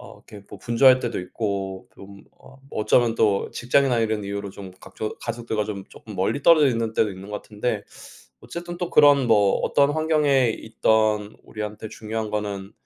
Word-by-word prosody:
어 - - -12
이렇게 100 -1 -14
뭐 105 - -11
분주할 130 +5 +5
때도 120 -5 -3
있고 95 0 -4
좀 100 0 -14 0.2
어 130 - -16 0.2
어쩌면 115 +2 +2
또 105 -4 +1
직장이나 125 0 +2
이런 110 -2 -1
이유로 100 0 -5
좀 95 -1 -10
각조 100 +3 -6
가족들과 115 -2 -3
좀 100 -2 -6
쪼끔 105 -3 -12
멀리 100 +9 -1
떨어져 155 -2 +6
있는 115 -3 -1
때도 110 - +2
있는 95 +2 -11
것 105 - -4
같은데 105 +3 -3 0.6
어쨌든 175 0 -8
또 175 -1 -3
그런 145 -3 +5
뭐 105 -3 +4
어떤 140 0 +3
환경에 150 -5 +2
있든 110 -1 0
우리한테 105 0 -6
중요한 110 0 -5
거는 100 -2 -4
110 Hz, 350 characters per minute, -23 LUFS, 100-125 Hz, 0.6 s, 떨어져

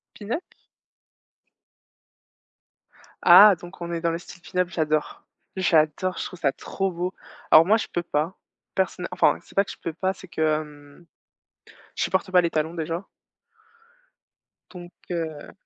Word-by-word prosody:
Pin-up? 225 - -4 2.8
Ah, 210 -1 +9
donc 175 +2 -13
on 170 0 -5
est 170 - -2
dans 170 0 0
le 165 - -2
style 175 0 -14
pin-up, 180 -1 -1
j'adore 155 -3 -1 0.3
j'adore, 170 0 +1
je - - -3
trouve 180 - -9
ça 140 - +2
trop 195 +7 -3
beau. 180 +2 -4 0.4
Alors 155 - +9
moi, 210 +5 +4
je 225 - -2
peux 175 - -1
pas. 165 +2 -2 0.4
Personn 185 -2 -1
enfin, 180 - +3
c'est - - -19
pas 200 - +3
que - - -11
je - - -8
peux 165 - -4
pas, 185 +4 -1
c'est 185 0 -13
que, 165 -2 -8
hem, 150 0 -3 0.9
je - - -3
supporte 190 0 0
pas 180 -1 +5
les 170 - 0
talons, 160 +1 -1
déjà. 165 +3 -4 1.6
Donc 175 -2 -11 0.2
heu 160 -4 -4
175 Hz, 155 wpm, -24 LUFS, 160-185 Hz, 2.8 s, Ah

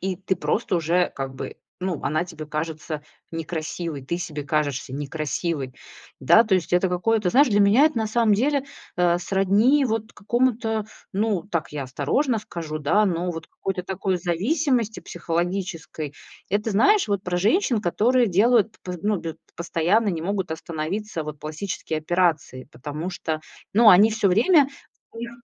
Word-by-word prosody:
и 190 -1 -2
ты 190 +1 -1
просто 190 +1 0
уже 170 +2 +1
как 135 -1 -5
бы, - - -6 0.2
ну, 180 -3 -3
она 155 +5 0
тебе 160 -4 -9
кажется 155 0 -4 0.3
некрасивой, 165 -2 -4
ты 170 +6 -3
себе 155 -5 -5
кажешься 145 -3 -1
некрасивой, 145 -1 -3 0.5
да. 220 - +6
То 215 -4 +1
есть 175 -2 -1
это 180 +1 +3
какое-то 195 +2 +1
знаешь, 275 +5 +5
для 205 -1 +3
меня 210 +9 +6
это 310 -7 +2
на 220 - 0
самом 220 -1 +2
деле, 275 +5 +1 0.3
э, 175 -1 +3
сродни 200 +10 +3
вот 225 -2 -2
какому-то, 225 -1 0 0.3
ну, 200 -3 0
так 165 -6 -3
я 145 -2 -3
осторожно 185 - 0
скажу, 165 -6 -6
да, 165 +9 +3
но 180 -1 0
вот 165 -1 -7
какой-то 190 -2 -4
такой 190 0 -1
зависимости 225 - 0
психологической. 170 -3 -3 0.3
Это, 210 +3 0
знаешь, 320 - +4
вот 200 -2 0
про 180 -2 -2
женщин, 225 - +2
которые 240 +7 +3
делают 220 +3 +3
п 180 - -5
п - - -8
ну, 210 0 +1
бю 165 -1 -5
п - - -31 0.2
постоянно, 175 +6 +1
не 165 -4 -2
могут 190 -1 -2
остановиться, 165 +3 -4
вот, 150 -1 -7
пластические 155 0 -4
операции. 160 -5 0
Потому 150 +7 -5
что, 160 -3 -3 0.3
ну, 225 0 +8
они 205 +4 +7
всё 215 -2 +1
время 270 - +5 0.5
у 230 - -11
них 235 0 -5
180 Hz, 165 wpm, -24 LUFS, 160-220 Hz, 0.5 s, ну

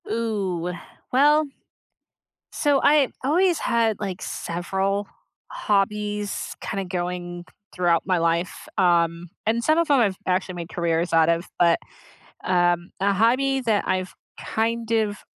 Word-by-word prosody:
Ooh, 195 -6 -2 0.4
well, 295 +4 +5 1.1
so 285 -2 +2
I 290 -2 +5 0.2
always 345 +5 +3
had, 225 -3 +1
like, 190 -3 -4
several 195 +4 -2 0.4
hobbies, 210 - -1
kinda, 195 -2 -3
going 175 -1 -4 0.3
throughout 175 -2 +2
my 185 -2 +2
life, 170 +1 -1
um, 170 -2 +2 0.2
and 230 +2 +1
some 310 +5 +3
of 335 -2 +1
'em 280 -3 +5
I've 200 -5 +2
actually 185 0 0
made 170 -1 -6
careers 170 -1 -1
out 165 -1 +4
of, 170 +1 +1
but, 170 -1 +4 0.7
um, 175 -1 +1
a 200 +1 +2
hobby 260 +6 +2
that 220 -4 0
I've, 185 0 -1 0.3
kind 230 +1 -2
of, 215 -2 0
195 Hz, 130 wpm, -23 LUFS, 175-230 Hz, 1.1 s, well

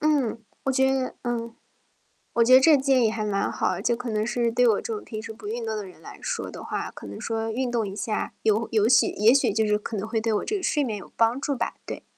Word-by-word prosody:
嗯， 275 -7 +1 0.2
我 270 - +1
觉 265 +1 +3
得 260 -1 -1
嗯。 235 -1 -3 0.8
我 235 - +4
觉 255 +2 +5
得 260 - +10
这 305 +2 +6
建 265 -2 +3
议 220 - +3
还 220 -1 -3
蛮 200 -1 0
好， - - -1
就 235 0 +1
可 245 -1 -5
能 215 0 0
是 240 0 0
对 245 +2 +2
我 225 - +5
这 450 - -4
种 425 - -7
平 215 -2 -6
时 225 0 -7
不 215 -1 -10
运 230 +2 -3
动 220 - -2
的 210 -1 -4
人 180 -3 -14
来 - - -11
说 - - -3
的 - - -9
话， - - -3
可 - - -11
能 100 - -8
说 225 0 -2
运 255 +2 -1
动 235 -2 0
一 195 - -6
下， 215 +1 -3
有 220 +1 +2
有 215 -1 +3
喜 245 - +5
也 215 +4 +4
许 275 - +3
就 220 +1 +1
是 210 - +3
可 215 +1 -5
能 205 +3 -3
会 225 -1 -1
对 225 0 0
我 210 - 0
这 425 - -1
个 390 - -3
睡 295 - +1
眠 220 -4 -3
有 195 - -11
帮 230 +3 +2
助 280 - -1
吧？ 240 -3 -2
对。 - - -6
230 Hz, 300 characters per minute, -25 LUFS, 215-255 Hz, 0.8 s, 得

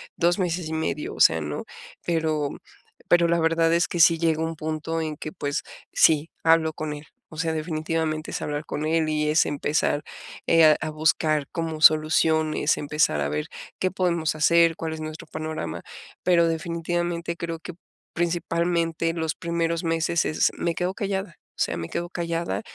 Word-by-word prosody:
2 175 +3 +2
meses 175 -2 -1
y - - -4
medio, 300 - -2
o - - -11
sea, - - +5
no, - - -4 0.4
pero 155 -4 0 0.6
pero 175 -1 +5
la 170 0 +2
verdad 165 0 +3
es 170 +3 +3
que 175 - -3
sí 165 0 +6
llega 160 -1 +1
un 165 0 -2
punto 155 +1 -3
en 155 -2 -4
que, 155 - -6
pues, 145 -6 -3 0.3
sí, 160 0 +4
hablo 165 -1 +4
con 155 -1 -4
él. 145 - -8 0.3
O 155 - -12
sea, 160 -1 0
definitivamente 155 0 -2
es - - -4
hablar 150 +1 -3
con 150 +1 -4
él, 160 0 +1
y 150 0 0
es 155 +2 +4
empezar, 145 0 0 0.5
eh, 165 0 +5
a 155 -1 +7
a - - -3
buscar 155 -1 +1
como 160 -2 -3
soluciones, 155 0 +4
empezar 150 - +1
a 70 - 0
ver 75 +1 -2 0.3
qué 185 - 0
podemos 170 -4 0
hacer, 165 +2 +4
cuál 160 -1 -4
es 160 - -6
nuestro 155 0 -7
panorama. 155 - -5 0.4
Pero 170 -2 +4
definitivamente 170 +1 -2
creo 165 -1 -5
que 180 - -8 0.4
principalmente 170 -1 0
los 160 -1 -2
primeros 170 0 -1
meses 165 0 +1
es 155 - +2
me 170 -1 -1
quedo 180 +1 -1
callada, 195 -4 -3 0.2
o - - -18
sea, - - +1
me 85 0 -5
quedo 175 0 -3
callada, 170 0 -2
165 Hz, 175 wpm, -25 LUFS, 155-170 Hz, 0.6 s, a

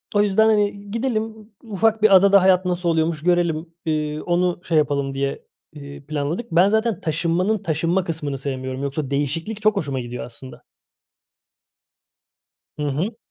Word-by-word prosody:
o 205 - +5
yüzden, 210 +2 +3
hani, 205 -2 0
gidelim, 220 -2 -3
ufak 220 0 0
bir 210 -2 +6
adada 200 +1 +6
hayat 185 0 +4
nasıl 180 -1 0
oluyormuş 160 -1 0
görelim, 175 -2 +1 0.2
eee, 155 -1 -1
onu 175 0 0
şey 165 -3 0
yapalım 140 -2 0
diye, 135 0 -3 0.3
eee, 140 -1 -10
planladık. 155 +9 -3
Ben 175 +3 +5
zaten 220 -2 0
taşınmanın 170 +6 0
taşınma 170 +1 0
kısmını 150 -5 -3
sevmiyorum. 130 -1 -4
Yoksa 140 0 -3
değişiklik 160 +10 -2
çok 215 0 +3
hoşuma 140 -8 -2
gidiyor 120 0 -6
aslında. 125 +2 -11 2.2
Hı - - -1
hı. 170 - -2
170 Hz, 145 wpm, -22 LUFS, 145-200 Hz, 2.2 s, bir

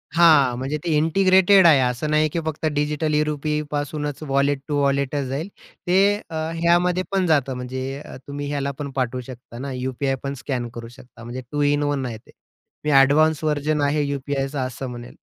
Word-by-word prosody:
हां, 155 -7 +5
म्हणजे 135 +4 -2
ते 175 - -2
इंटिग्रेटेड 190 +4 +5
आहे, 150 -4 +6
असं 125 +3 -1
नाही 155 0 +3
की 170 - -2
फक्त 160 0 -3
डिजिटल 150 +1 0
ई-रुपी 150 0 0
पासूनच 145 0 -3
वॉलेट 140 +1 +1
टू 145 -2 -1
वॉलेटच 140 0 0
जाईल. 140 +7 -3 0.4
ते 180 - +3 0.3
अ, 165 - -7 0.2
ह्यामध्ये 175 +2 +2
पण 195 -2 +1
जातं, 140 -5 +2
म्हणजे 130 +2 -5 0.3
तुम्ही 145 0 -5
अ, - - -5
ह्याला 140 -1 -2
पण 145 -1 -4
पाठवू 130 -1 -1
शकता 125 -2 -11
ना, 140 +1 -5
यू-पी-आय 130 +1 -2
पण 140 0 -3
स्कॅन 125 -3 -2
करू 115 -1 -7
शकता, 120 -1 -15
म्हणजे 120 +2 -6
2 145 - -1
इन 145 0 +1
1 145 -2 -1
आहे 115 -3 -5
ते. 110 - -21 0.5
मी 150 - +1
एडवान्स 155 +3 +3
व्हर्जन 150 0 0
आहे 145 +1 +1
यू-पी-आयचं 140 0 -3
असं 130 0 -4
म्हणेल. 120 0 -9
145 Hz, 185 wpm, -22 LUFS, 130-155 Hz, 0.5 s, आहे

